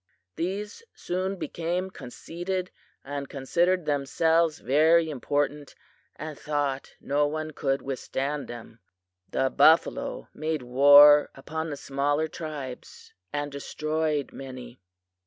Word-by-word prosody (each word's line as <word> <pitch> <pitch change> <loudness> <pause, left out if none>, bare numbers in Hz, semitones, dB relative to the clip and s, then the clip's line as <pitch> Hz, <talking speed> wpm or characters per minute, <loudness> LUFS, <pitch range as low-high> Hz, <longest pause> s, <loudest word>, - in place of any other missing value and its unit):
"These 200 - -4
soon 185 +2 -2
became 180 +1 -3
conceited 180 +8 -5 0.3
and 140 0 -5
considered 170 +6 +1
themselves 160 +3 +2
very 160 +5 +3
important, 145 +1 -2 0.4
and 155 -1 -7
thought 145 -2 -2
no 145 +1 +1
one 155 +1 -4
could 135 -2 -1
withstand 140 +2 -3
them. 115 -1 -10 0.5
The 130 - 0
buffalo 165 - +3
made 155 -2 -3
war 145 +4 +8
upon 160 +4 -5
the 145 - -5
smaller 145 +3 0
tribes, 150 -5 -8 0.2
and 145 0 -3
destroyed 155 +1 -2
many. 130 -2 -9
150 Hz, 105 wpm, -27 LUFS, 140-160 Hz, 0.5 s, war